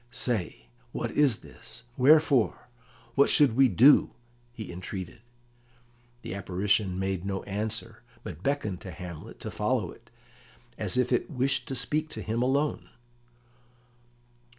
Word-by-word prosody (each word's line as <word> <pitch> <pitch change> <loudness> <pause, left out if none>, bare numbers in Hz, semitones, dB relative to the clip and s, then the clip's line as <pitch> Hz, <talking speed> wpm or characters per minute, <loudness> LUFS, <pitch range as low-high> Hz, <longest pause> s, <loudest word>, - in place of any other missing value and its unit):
"Say, 115 - -1 0.3
why - - -2
is 140 -7 +3
this? 115 +1 -8
Wherefore? 140 -3 +4 0.5
What 140 +3 +4
should 140 -6 +4
we 135 +1 +6
do?" 125 +9 +6 0.4
he 110 -6 -8
entreated. 95 +4 -7 1.0
The - - -5
apparition 95 0 0
made 95 -1 -2
no 95 -1 -3
answer, 105 +2 -4 0.2
but 80 - -8
beckoned 110 -7 -1
to 95 - -8
Hamlet 85 -1 -9
to - - -5
follow - - -1
it, - - -17 0.7
as - - -2
if 125 0 +2
it 125 - 0
wished 135 -2 0
to 135 - -3
speak 150 +5 -1
to - - -6
him 115 +2 -1
alone. 140 +4 0
115 Hz, 130 wpm, -28 LUFS, 95-135 Hz, 1.0 s, we